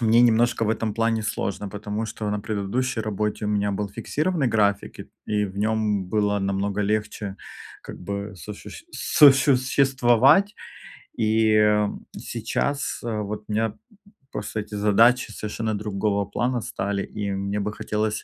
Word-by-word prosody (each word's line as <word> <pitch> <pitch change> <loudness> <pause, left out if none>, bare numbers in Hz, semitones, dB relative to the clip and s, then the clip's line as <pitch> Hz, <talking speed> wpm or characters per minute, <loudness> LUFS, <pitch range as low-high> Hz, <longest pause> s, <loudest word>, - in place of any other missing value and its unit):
мне 115 0 +4
немножко 120 0 +3
в - - 0
этом 110 -2 -1
плане 115 -1 +1
сложно. 105 -1 -3
Потому 105 +2 -4
что 105 -1 -4
на 105 - -1
предыдущей 110 +5 -2
работе 105 0 -2
у - - -1
меня 105 -1 0
был 100 +1 -2
фиксированный 155 - -1
график, 100 -2 +1
ик - - -10 0.2
и 105 -1 +1
в 95 +1 -8
нем 105 -2 0
было 105 0 +1
намного 100 +1 -1
легче 105 -1 -2 0.5
как - - -9
бы 100 +1 -5
сощущ 105 - -9
сосуществовать. 135 - +4 0.7
И, 110 0 +3
м, 105 -1 +2
сейчас, 140 0 -2
э, 110 -2 -2
вот 105 +1 -5
у - - -6
меня 110 0 0 0.6
просто 105 +1 -4
эти 105 0 -8
задачи 110 +4 +4
совершенно 110 +1 -3
другого 100 0 -1
плана 120 +4 -1
стали. 100 -1 -2
И 100 -1 -4
мне 100 +1 -2
бы 105 +1 -2
хотелось 105 0 -2
105 Hz, 150 wpm, -24 LUFS, 100-115 Hz, 0.7 s, мне